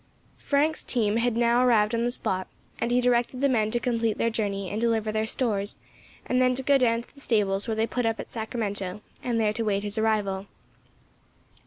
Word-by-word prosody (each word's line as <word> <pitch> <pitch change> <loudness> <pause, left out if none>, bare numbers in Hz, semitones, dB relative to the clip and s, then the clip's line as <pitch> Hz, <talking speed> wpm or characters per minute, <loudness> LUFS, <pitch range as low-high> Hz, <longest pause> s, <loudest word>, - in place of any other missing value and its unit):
Frank's 300 +2 +1
team 220 -3 0
had 235 -1 +1
now 235 +1 +3
arrived 220 -3 +3
on 230 0 +1
the - - +1
spot, 185 -6 -2 0.3
and 235 - 0
he 245 +1 +3
directed 245 +1 +1
the 280 - +3
men 220 -5 +2
to 240 +2 0
complete 230 -3 0
their 230 - +1
journey 200 -3 -2
and 215 - -2
deliver 225 -2 +1
their 215 0 -1
stores, 210 -5 -2 0.5
and 255 0 +1
then 255 0 +3
to 265 - -2
go 280 +1 +4
down 230 -2 +2
to - - -21
the 280 - -13
stables 205 -5 +1
where 225 - -1
they 220 +1 +1
put 245 0 -1
up 225 0 -1
at - - -5
Sacramento 210 -4 -4 0.2
and 235 -2 -1
there 210 -1 +2
to 230 - -2
wait 200 -2 0
his 205 +1 -2
arrival. 205 -3 0
225 Hz, 210 wpm, -26 LUFS, 210-245 Hz, 0.5 s, go